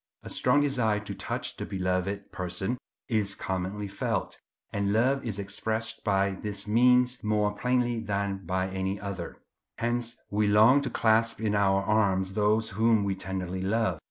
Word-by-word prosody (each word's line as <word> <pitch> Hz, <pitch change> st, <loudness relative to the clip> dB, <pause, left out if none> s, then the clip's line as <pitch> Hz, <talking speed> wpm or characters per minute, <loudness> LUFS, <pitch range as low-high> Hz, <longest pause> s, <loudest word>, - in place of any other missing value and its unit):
A -, -, -6 dB
strong 135 Hz, +3 st, +3 dB
desire 125 Hz, -7 st, +1 dB
to 105 Hz, -1 st, -6 dB
touch 95 Hz, -, -3 dB
the -, -, -4 dB
beloved 95 Hz, +1 st, -2 dB
person 95 Hz, +7 st, -3 dB, 0.3 s
is 105 Hz, -4 st, 0 dB
commonly 95 Hz, +2 st, -3 dB
felt; 95 Hz, -, -3 dB, 0.3 s
and 100 Hz, 0 st, 0 dB
love 130 Hz, +6 st, +2 dB
is 110 Hz, -5 st, -3 dB
expressed 110 Hz, +3 st, -2 dB
by 100 Hz, -1 st, +2 dB
this 100 Hz, +1 st, -4 dB
means 125 Hz, +3 st, +4 dB
more 105 Hz, -1 st, +1 dB
plainly 120 Hz, +1 st, 0 dB
than 100 Hz, -2 st, -2 dB
by 95 Hz, +1 st, 0 dB
any 95 Hz, +1 st, -2 dB
other. 95 Hz, -4 st, -6 dB, 0.4 s
Hence 120 Hz, 0 st, -1 dB
we 105 Hz, +1 st, +2 dB
long 110 Hz, +7 st, +6 dB
to 140 Hz, -, -3 dB
clasp 115 Hz, 0 st, +2 dB
in 110 Hz, -2 st, 0 dB
our 100 Hz, -1 st, +3 dB
arms 95 Hz, -3 st, +1 dB
those 110 Hz, +2 st, +2 dB
whom 110 Hz, +1 st, +2 dB
we 100 Hz, -1 st, 0 dB
tenderly 95 Hz, -1 st, -4 dB
love. 95 Hz, -3 st, 0 dB
105 Hz, 155 wpm, -28 LUFS, 95-115 Hz, 0.4 s, long